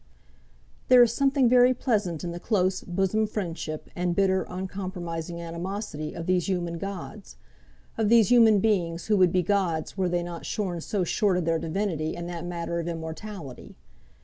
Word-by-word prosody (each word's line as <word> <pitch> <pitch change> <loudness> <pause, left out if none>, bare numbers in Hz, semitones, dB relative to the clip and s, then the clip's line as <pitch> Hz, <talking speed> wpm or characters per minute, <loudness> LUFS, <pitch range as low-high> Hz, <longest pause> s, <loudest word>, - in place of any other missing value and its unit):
There 250 -1 +8
is 235 -1 +2
something 275 -1 +3
very 250 +1 +5
pleasant 205 - -1
in 175 - -3
the 170 - -6
close, 185 -2 0
bosom 195 +4 0
friendship, 165 -7 -5
and 175 -1 -1
bitter, 190 -1 +2
uncompromising 180 -3 -5
animosity, 170 -1 -5
of 165 - -5
these 180 0 +1
human 175 -3 -2
gods, 195 +2 -7 0.6
of 215 -2 +2
these 230 -1 +5
human 225 -3 +7
beings 175 -6 0
who 215 -1 +2
would 185 -2 +5
be 180 0 +2
gods 180 -3 -1
were 185 -1 +1
they 175 0 0
not 170 -1 -7
shorn 180 -5 -3
so 195 +3 -1
short 185 +2 +1
of 180 - -1
their 165 0 +1
divinity 165 -2 -2
in 175 0 -6
that 175 0 -5
matter 170 -1 -3
of 170 - -4
immortality. 165 -2 -7
180 Hz, 170 wpm, -26 LUFS, 170-205 Hz, 0.6 s, There